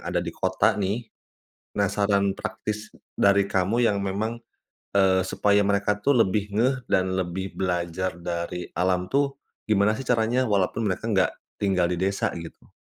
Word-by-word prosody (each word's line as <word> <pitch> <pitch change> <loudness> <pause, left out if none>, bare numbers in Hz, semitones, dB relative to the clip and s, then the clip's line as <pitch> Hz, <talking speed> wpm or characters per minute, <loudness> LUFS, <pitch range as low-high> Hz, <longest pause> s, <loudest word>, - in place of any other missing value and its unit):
ada - - -1
di - - -4
kota - - +2
nih, 105 +5 -1 0.7
penasaran 100 0 +1
praktis 105 +1 -5 0.2
dari 100 0 +4
kamu 100 +6 +1
yang 100 -2 +1
memang, 110 +5 -2 0.5
eee, 95 -2 +4
supaya 100 +1 +2
mereka 100 +1 +1
tuh 135 +8 +2
lebih 105 -3 +1
ngeh 125 +6 +2 0.2
dan 95 0 +3
lebih 95 +1 -3
belajar 90 0 -1
dari 85 0 -4
alam 90 0 +1
tuh 140 +3 +1 0.3
gimana 105 0 +2
sih 135 - -6
caranya, 120 +2 +2
walaupun 105 +1 0
mereka 105 +3 -2
nggak 95 -6 +2 0.3
tinggal 95 -3 +2
di 90 - -3
desa 95 +1 0
gitu? 85 -1 -10
100 Hz, 150 wpm, -25 LUFS, 95-110 Hz, 0.7 s, dari